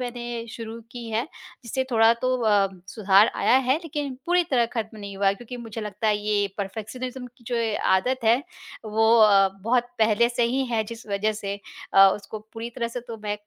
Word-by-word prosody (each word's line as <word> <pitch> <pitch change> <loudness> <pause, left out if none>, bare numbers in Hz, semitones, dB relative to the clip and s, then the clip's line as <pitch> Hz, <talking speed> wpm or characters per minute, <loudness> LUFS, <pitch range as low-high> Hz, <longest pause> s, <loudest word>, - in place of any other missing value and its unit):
मैंने 240 -1 -5
शुरू 230 0 -7
की 240 -1 -7
है 220 +2 0 0.4
जिससे 260 +3 -2
थोड़ा 225 0 +5
तो 255 0 +2
अ, 205 -3 +3 0.3
सुधार 205 -1 +5
आया 255 - +4
है 265 - +4
लेकिन 290 -4 -4
पूरी 355 0 +3
तरह 240 -4 +3
खत्म 220 -1 -4
नहीं 200 -1 -8
हुआ 200 - 0
है 195 - +4
क्योंकि 240 +4 -9
मुझे 225 -2 -7
लगता 210 +1 -4
है 210 - +3
ये 205 -1 0
परफेक्शनिज्म 245 +6 -5
की 245 0 -20
जो 240 - -1
ये 225 -2 0 0.2
आदत 250 +6 0
है 230 +2 +5 0.5
वो 220 +1 +2
अ, 200 -3 +6
बहुत 245 +2 +1
पहले 225 +2 +3
से 240 0 -1
ही 270 - +1
है 220 - +2
जिस 230 +1 -9
वजह 205 +1 0
से 200 0 -3 0.4
अ, 195 0 +9
उसको 205 +1 -8
पूरी 230 +1 -6
तरह 235 0 -3
से 245 +1 -5
तो 230 - -5
मैं 205 0 -2
225 Hz, 205 wpm, -24 LUFS, 210-245 Hz, 0.5 s, अ